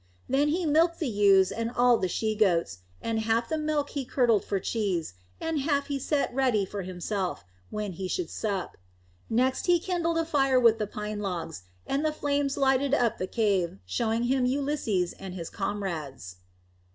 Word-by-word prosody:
Then 275 +3 +2
he 335 +4 0
milked 330 +3 +3
the 315 - -2
ewes 200 -4 +4
and 230 0 -2
all 245 0 +4
the 185 - 0
she 215 +4 -1
goats, 175 - +1 0.2
and 225 -1 0
half 225 +1 +1
of - - -19
the 315 - 0
milk 300 -2 -1
he 280 - -2
curdled 240 -5 +2
for 200 - -1
cheese, 185 - -2 0.3
and 325 -2 -1
half 280 0 0
he 280 -1 -1
set 280 -1 0
ready 250 -6 +2
for 200 +1 -5
himself, 185 - -3 0.2
when 210 -2 -3
he 185 +2 -5
should 355 - -3
sup. 200 -4 -3 0.5
Next 255 +7 +1
he 350 -1 +5
kindled 335 -2 -1
a 330 - +1
fire 270 -5 +3
with 230 -2 +5
the 210 - -1
pine 210 0 -5
logs, 170 - -4 0.2
and 275 +2 -1
the 310 - +2
flame 285 -2 0
lighted 275 0 +3
up 240 -5 +3
all - - -19
the 185 - -2
cave, 195 - 0
showing 225 - 0
him 255 +1 +2
Ulysses 260 -9 0
and 190 -1 -7
his 170 -3 -6
comrades. 155 - -4
230 Hz, 190 wpm, -28 LUFS, 195-280 Hz, 0.5 s, he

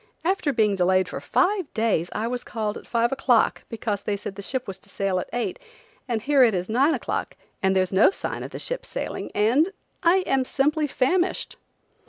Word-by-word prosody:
After 360 -5 +1
being 220 -5 +2
delayed 185 0 +2
for - - -6
five 380 -5 +1
days 215 -7 +1
I 215 - -2
was 245 0 -3
called 215 -2 -3
at - - -10
five 235 0 +1
o'clock 255 -4 +2
because 220 -3 -3
they 205 0 -2
said 195 - -6
the 200 - -8
ship 255 +5 -3
was 195 -1 -6
to 200 - -17
sail 195 -2 -1
at - - -6
eight, 245 - -2 0.5
and 230 -4 -2
here 280 0 +4
it 230 -5 +5
is 180 +2 -2
nine 275 +7 +3
o'clock - - -3 0.3
and 190 -1 +2
there's 185 -1 +2
no 190 - +6
sign 390 - -4
of - - -6
the - - -7
ship - - -3
sailing - - -5
and–I 335 - +2
am 270 -1 +2
simply 295 +4 +1
famished." 345 +8 0
235 Hz, 200 wpm, -24 LUFS, 200-285 Hz, 0.5 s, no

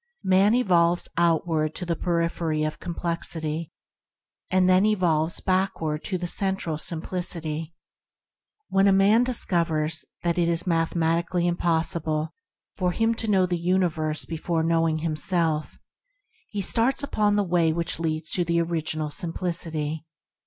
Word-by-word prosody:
Man 195 +4 +4
evolves 175 -7 +2
outward 160 -2 +1
to 180 - -4
the 170 -1 -1
periphery 170 -3 -1
of 155 0 -3
complexity, 165 -2 -3 0.8
and 185 0 +3
then 185 +1 +5
involves 175 -6 +1
backward 185 -5 -1
to 185 - -1
the 175 - -4
Central 185 -4 -1
Simplicity. 165 -1 -2 0.9
When 195 +1 +3
a - - +5
man 200 +5 +4
discovers 165 -10 +1 0.2
that 170 0 0
it 170 -1 +2
is 170 0 +4
mathematically 170 +1 0
impos 170 -1 0
sible 155 0 -2 0.5
for 180 -2 0
him 225 +3 +1
to 225 0 -4
know 190 -3 +3
the 175 -1 -2
universe 170 -4 0
be 165 - -5
fore 165 0 -1
knowing 165 -1 +1
himself, 160 -1 -1 0.7
he 205 - -3
starts 235 +8 +2
upon 210 -6 +1
the 205 - +2
Way 170 -3 +2
which 170 0 -2
leads 160 -1 -3
to 180 - +1
the 170 0 0
Original 160 -2 -2
Simplicity. 160 -2 -3
170 Hz, 140 wpm, -25 LUFS, 160-185 Hz, 0.9 s, then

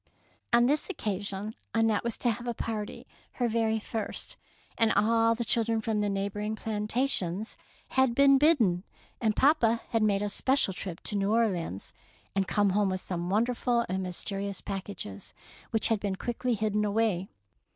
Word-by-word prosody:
On 240 0 +5
this 290 +4 +1
occasion 200 +1 -3 0.2
Annette 225 -2 +2
was 235 -1 -2
to 240 - +1
have 240 +2 -6
a 240 - -2
party, 215 -2 -4 0.3
her 245 - 0
very 225 -1 +1
flrst, 215 0 -4 0.4
and 225 -1 +3
all 225 +2 +3
the 235 0 -3
chil 230 +1 +4
dren 225 0 0
from 220 -1 -1
the 205 - 0
neighbouring 200 +2 -2
plantations 215 -2 -1 0.3
had 260 -3 +2
been 275 0 +6
bidden; 235 - +3 0.4
and 220 -3 +2
papa 235 -6 +3
had 225 - +1
made 205 -1 +2
a 205 - -1
special 260 -1 +2
trip 180 -2 -6
to 210 - -2
New 200 0 +1
Orleans 190 - 0 0.4
and 195 -1 +1
come 205 -2 +2
home 205 0 +2
with 185 0 -2
some 175 -1 -4
wonderful 235 +3 +1
and 190 +1 -2
myste 185 +2 -3
rious 200 0 -4
packages, 190 - -6 0.3
which 225 +1 +3
had 225 -2 +2
been 200 -2 -2
quickly 240 +3 -2
hidden 210 0 0
away. 205 -3 +1
215 Hz, 170 wpm, -29 LUFS, 200-230 Hz, 0.4 s, been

